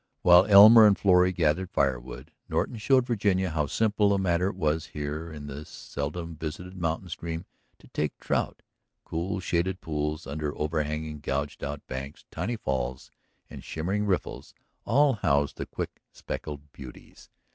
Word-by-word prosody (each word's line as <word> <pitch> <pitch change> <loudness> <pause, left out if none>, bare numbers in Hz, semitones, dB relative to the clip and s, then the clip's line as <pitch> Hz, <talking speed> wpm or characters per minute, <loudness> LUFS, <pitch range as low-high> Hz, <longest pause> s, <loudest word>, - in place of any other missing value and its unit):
While 90 +2 +7
Elmer 110 +2 +10
and 100 - +4
Florrie 90 -2 +4
gathered 90 +1 0
fire 70 -7 +1
wood, 60 +1 -11 0.2
Norton 120 - -1
showed 130 +4 +3
Virginia 100 -6 +1
how 75 -2 0
simple 105 +1 +2
a - - +1
matter 90 -1 +1
it - - -7
was 80 -3 -1
here 75 +3 -4
in 75 -2 -8
this 75 +1 -8
seldom 85 +4 -5
visited 85 +4 -6
mountain 85 +1 -2
stream 85 0 -5 0.3
to - - -19
take 75 - -2
a - - -21
trout. - - -1 0.4
Cool, 85 +3 -3
shaded 90 +1 -1
pools 75 -1 -3
under 75 +1 -4
overhanging, 75 0 -2
gouged 70 0 -3
out 70 0 -5
banks, 70 +2 -7
tiny 120 +3 -2
falls, 65 - -3 0.4
and - - -10
shimmering 95 +6 -2
riffles 95 -3 -3 0.3
all 140 +5 +4
housed 70 -1 +1
the - - -5
quick - - -6
speckled 75 -1 -7
beauties. 65 -3 -13
80 Hz, 155 wpm, -27 LUFS, 75-95 Hz, 0.4 s, Elmer